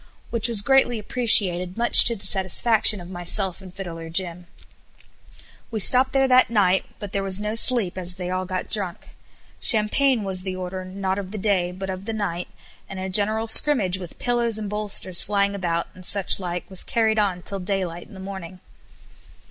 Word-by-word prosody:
which 230 -1 +2
was 225 -4 +2
greatly 265 -2 +2
appreciated 200 -5 +2
much 235 0 +8
to 235 - +1
the 200 -2 -12
satisfaction 210 +3 +1
of 175 - -11
myself 180 +1 -2
and 185 -1 -13
Fiddler 165 -4 -8
Jim. 175 0 -4 1.2
We 225 - -5
stopped 255 +5 +5
there 270 -1 +1
that 255 0 +3
night, 190 -4 +1
but 205 -3 -9
there 200 - -3
was 195 0 0
no 210 +1 -4
sleep 225 -5 +4
as 180 0 -4
they 180 -1 -6
all 185 0 -3
got 185 0 -5
drunk. 195 -5 -3 0.5
Champagne 230 +2 +2
was 190 -2 -3
the 185 0 -6
order, 185 0 -7
not 190 +1 -4
of 190 -2 -8
the 215 - -8
day, 190 -3 -1
but 190 +1 -7
of 185 +1 -9
the 225 - -5
night, 180 -5 -4 0.4
and 195 - -8
a 190 0 -5
general 215 +3 0
scrimmage 220 -6 +4
with 180 -3 -11
pillows 240 -2 -1
and 210 -2 -6
bolsters 205 -4 +2
flying 200 0 -1
about, 170 -4 -3
and 185 - -15
such 200 +1 +2
like, 175 -1 -6
was 190 -2 0
carried 220 -2 -1
on 185 -4 -2
till 195 - -5
daylight 180 -2 -5
in 210 - -16
the - - -12
morning. 190 -2 -9
195 Hz, 190 wpm, -22 LUFS, 185-220 Hz, 1.2 s, much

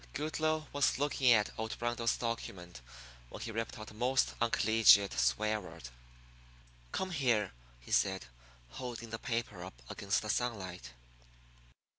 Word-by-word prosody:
Goodloe 155 +1 -1
was 145 -3 +2
looking 135 -2 +3
at 105 -3 +4
old 110 0 -4
Rundle's 120 -1 0
document 90 - -5 0.5
when - - -9
he 115 - -4
ripped 115 0 -4
out 110 0 -9
a - - -14
most 125 +4 +1
uncollegiate 110 -3 +5
swear 65 - +1
word. 75 -9 -10 1.0
"Come 190 0 -2
here," 120 - +1 0.3
he - - -13
said, 95 -5 +2 0.4
holding 115 - -7
the 115 - -4
paper 115 -7 -3
up 90 -10 -10
against 100 +1 0
the 105 - -5
sunlight. 95 - -3
115 Hz, 135 wpm, -33 LUFS, 100-120 Hz, 1.0 s, uncollegiate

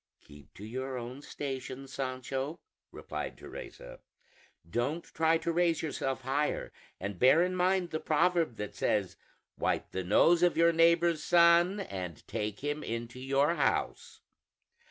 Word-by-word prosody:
"Keep 75 0 -17
to 105 - -9
your 130 +3 -4
own 125 +3 -7
station, 135 -2 -6
Sancho," 135 +3 -4 0.3
replied - - -6
Teresa; - - -10 0.7
"don't 145 +8 -1
try 160 0 +1
to 170 - -2
raise 170 -1 +1
yourself 135 -4 -2
higher, 140 +3 -1 0.3
and 100 -1 -5
bear 140 +7 +6
in 185 0 -1
mind 185 -1 +1
the 155 - -2
proverb 165 -2 +1
that 105 -2 -5
says, 100 -3 0 0.4
'Wipe - - -1
the 95 - -3
nose 165 - +4
of 175 -1 +3
your 170 0 +5
neighbor's 165 0 +3
son, 175 +3 +5
and 90 - -7
take 105 -1 -4
him 145 +1 -2
into 115 +2 -5
your 135 +4 +2
house.' - - -1
145 Hz, 140 wpm, -31 LUFS, 125-170 Hz, 0.7 s, bear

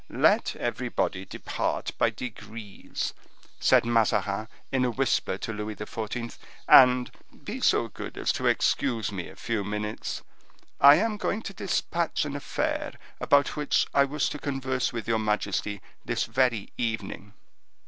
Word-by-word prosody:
"Let - - +3
everybody 95 +1 -2
depart - - -3
by - - +4
degrees," 110 -4 -6 0.5
said - - +5
Mazarin 110 -2 +1 0.2
in 130 -1 +2
a 125 - +2
whisper 130 +1 0
to 115 - -4
Louis 105 0 -4
XIV., 115 +2 -5 0.3
"and 125 -1 +7 0.3
be - - -5
so - - +3
good - - -8
as - - +1
to - - -1
excuse 115 -4 +1
me 95 -3 -5
a 95 - -13
few 110 +1 -2
minutes. 105 +1 -4 0.6
I 140 +1 +9
am 215 +5 0
going 210 +2 -2
to 195 - -6
dispatch 170 -4 -1
an 145 -1 -4
affair 145 - -2 0.3
about 140 -1 +3
which 150 -1 +2
I 140 - +5
wish 150 +2 -1
to 150 - -6
converse 130 -3 -1
with 115 -3 -5
your 115 -1 +2
majesty 105 -1 -1 0.2
this - - -1
very 125 -6 +1
evening." 110 -3 -3
115 Hz, 145 wpm, -27 LUFS, 105-135 Hz, 0.6 s, I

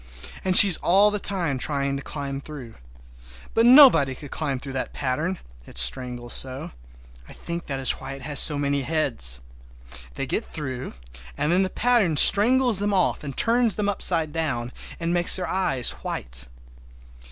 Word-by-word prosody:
And 185 -1 +5
she 205 - +12
is 180 - +2
all 200 +4 +3
the 210 - -2
time 175 -10 -3
trying 140 0 -1
to 140 - -5
climb 140 -1 -6
through. 135 -6 -10 0.8
But 230 +1 +3
nobody 240 - +6
could 145 +1 -12
climb 145 -4 -3
through 135 +1 -9
that 130 - -4
pattern—it 130 - -6
strangles 120 - -1
so; 130 0 -3 0.6
I - - -10
think 170 0 -7
that 135 -2 -4
is 130 - +3
why 135 - -6
it 135 -1 -11
has 145 0 -1
so 150 - +4
many 140 0 -1
heads. 120 - -1 0.7
They - - -4
get - - -3
through, 130 - -7 0.4
and 150 - -1
then 180 +2 +2
the 190 - -1
pattern 220 -9 +1
strangles 240 - +4
them 205 0 -1
off 185 - 0
and 140 -3 -8
turns 230 -3 +2
them 210 -1 -2
upside 165 -6 -2
down, 135 -7 -3 0.3
and 170 0 -2
makes 175 0 +2
their 185 -1 -3
eyes 160 -10 -1
white! 60 +1 -6
150 Hz, 170 wpm, -23 LUFS, 130-190 Hz, 0.8 s, she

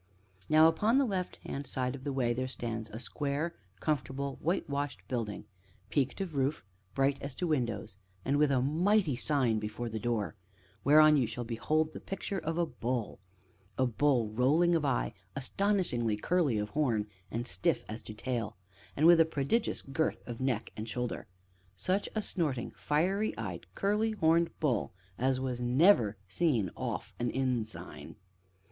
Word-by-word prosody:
Now, 155 +1 +7
upon 210 +10 +3
the 275 - +4
left 190 -5 -2
hand 140 +1 -4
side 125 -1 -1
of 135 -1 -8
the 145 - -2
way, 125 -3 +1
there 130 +2 -2
stands 115 -3 -4
a 105 - -7
square, 145 +5 -2 0.3
comfortable, 140 0 -2
whitewashed 145 - -2
building, 115 -5 -3 0.5
peaked 140 +3 +1
of 185 -4 -3
roof, 135 -5 0 0.3
bright 135 +1 +2
as 140 -1 -5
to 180 - -2
windows, 115 - -1 0.3
and 140 +2 +2
with 150 0 +4
a 130 -2 +3
mighty 170 +2 +2
sign 125 -4 +1
before 105 +3 -4
the 110 0 -4
door, 115 -3 -1 0.5
whereon 155 +1 +7
you 125 -4 +2
shall 115 +2 -4
behold 155 +7 0
the - - -6
picture 195 0 -4
of 165 0 -3
a 175 - +3
bull: 120 -5 -3 0.6
a 130 - +3
bull 125 -2 +2
rolling 150 +10 +3
of 165 -2 +2
eye, 135 -4 0 0.2
astonishingly 140 - 0
curly 155 -2 +1
of 105 0 -2
horn 120 -6 +1 0.2
and 115 +4 -3
stiff 90 -5 0
as 110 +2 -6
to 110 - -9
tail, 115 -2 -3 0.4
and 150 - +3
with 170 0 +8
a - - +9
prodigious 160 - 0
girth 140 +4 -1
of 120 0 -6
neck 125 -4 -1
and 110 +1 -5
shoulder; 125 +1 -3 0.5
such 185 - 0
a 215 - 0
snorting, 145 -12 -1
fiery 190 +8 0
eyed, 95 -6 -5
curly 210 +3 +1
horned 170 -3 +3
bull 130 - 0 0.3
as 130 +1 +2
was 130 -2 -2
never 125 - +4
seen 115 - +1
off - - -4
an 120 0 0
inn 130 -3 0
sign. 110 - -9
135 Hz, 165 wpm, -31 LUFS, 115-160 Hz, 0.6 s, a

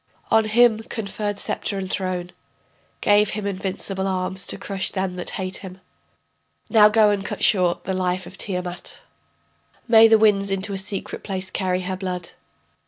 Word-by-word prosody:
On 220 0 +4
him 225 0 +4
conferred 210 -2 -4
sceptre 200 - -1
and 190 -1 -3
throne.... 185 -2 -3 0.7
Gave 205 0 +4
him 210 -1 -4
invincible 190 0 -3
arms 190 0 -1
to - - -1
crush 195 -2 -2
them 190 -1 -2
that 180 -1 -5
hate 185 0 -3
him. 190 -1 -10 0.9
Now 210 -2 +7
go 210 -1 +4
and 200 -1 -1
cut - - -5
short 180 -4 +3
the 190 - -3
life 185 0 -1
of 190 - -11
Tiamat, 180 -3 -4 0.8
May 225 -1 +8
the 225 0 +6
winds 205 -2 +3
into 195 +1 -1
a - - -2
secret 195 0 -4
place 190 -1 -4
carry 185 -1 -1
her 185 0 -4
blood. 180 -2 -4
195 Hz, 165 wpm, -22 LUFS, 185-210 Hz, 0.9 s, May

